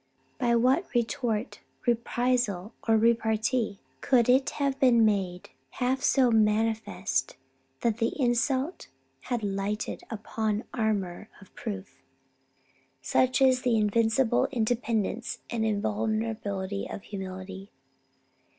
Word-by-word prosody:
By 235 -1 +2
what 260 +9 +3
retort, 235 -1 -1 0.3
reprisal, 240 -4 0
or 225 -1 +5
repartee 225 -1 +1 0.2
could 245 -3 +3
it 260 +2 +4
have 275 -1 0
been 240 -5 +5
made 190 -4 -1 0.2
half 255 - -1
so 260 -4 +4
manifest 210 - +1 0.4
that 230 -1 0
the 230 +5 -1
insult 260 +5 0 0.4
had 240 -3 -1
lighted 200 +1 -2
upon 220 0 -2
armour 210 -4 -1
of 195 - -17
proof? 195 - -7 1.0
Such 255 +1 +2
is 255 -1 +4
the 245 -3 +2
invincible 225 +3 +2
independence 230 -2 -1
and 230 -2 -1
invulnerability 190 - -2
of 200 - -7
humility." 190 0 -7
220 Hz, 105 wpm, -28 LUFS, 200-245 Hz, 1.0 s, or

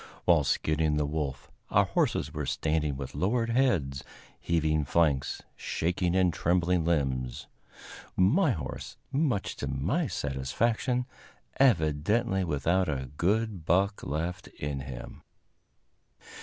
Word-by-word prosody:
While 85 -4 +5
skinning 75 +2 +1
the 75 - +1
wolf, 70 -3 -4 0.2
our - - +4
horses - - 0
were - - -3
standing 75 -3 0
with 70 -2 -6
lowered 115 +4 0
heads, 95 - +1 0.4
heaving 80 -2 +1
flanks, 70 -2 +1
shaking 90 +1 -1
and 90 -2 +3
trembling 90 0 +2
limbs; 65 -7 -1 0.7
my 145 - +4
horse, 80 - -4
much 135 -8 0
to 70 - -3
my 85 - 0
satisfaction, 110 - -1 0.5
evidently 95 - +2
without 85 +3 +1
a 65 -3 -3
good 105 +1 0
buck 95 +5 +1
left 85 +5 -3
in 70 -1 -5
him. 65 -2 -8
85 Hz, 115 wpm, -29 LUFS, 70-100 Hz, 0.7 s, While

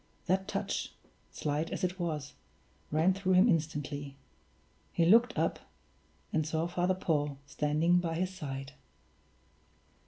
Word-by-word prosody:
That 190 +1 +1
touch, - - -2 0.4
slight 150 +2 -2
as - - -4
it 180 +1 -1
was, 155 -5 -3 0.6
ran 160 +5 +3
through 190 0 0
him 185 +5 +6
instantly. 145 - -1 0.8
He 170 - +2
looked 235 +7 +5
up, - - +1 0.7
and 155 - +2
saw 160 +2 -1
Father 180 +1 +1
Paul 150 -6 0
standing 155 +4 +2
by 165 -2 -2
his 185 +2 -1
side. 135 -6 -6
165 Hz, 125 wpm, -31 LUFS, 150-185 Hz, 0.8 s, him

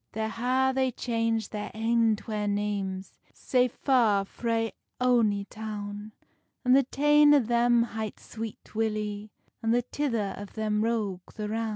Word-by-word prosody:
There 220 0 -2
ha 255 +3 +1
they 260 0 +2
changed 230 -2 -1
their 210 -1 -4
ain 225 0 +2
twa 210 -1 -4
names, 200 -2 -3 0.2
Sae 250 -1 +2
far 230 -6 +2
frae 225 +1 -1 0.3
ony 230 -5 +2
town; 210 0 -7 0.5
And 250 +1 +6
the 275 - +7
tane 295 +2 +5
o - - +6
them 240 0 +3
hight 220 -2 -5
Sweet 225 -1 -8
Willy, 215 -1 -2 0.3
And 225 +1 +2
the 245 - +2
tither 230 -7 -2
o 205 - -5
them 210 0 -2
Roge 215 -5 -1 0.2
the 210 -1 -4
Roun. 225 +1 -1
225 Hz, 150 wpm, -28 LUFS, 210-240 Hz, 0.5 s, the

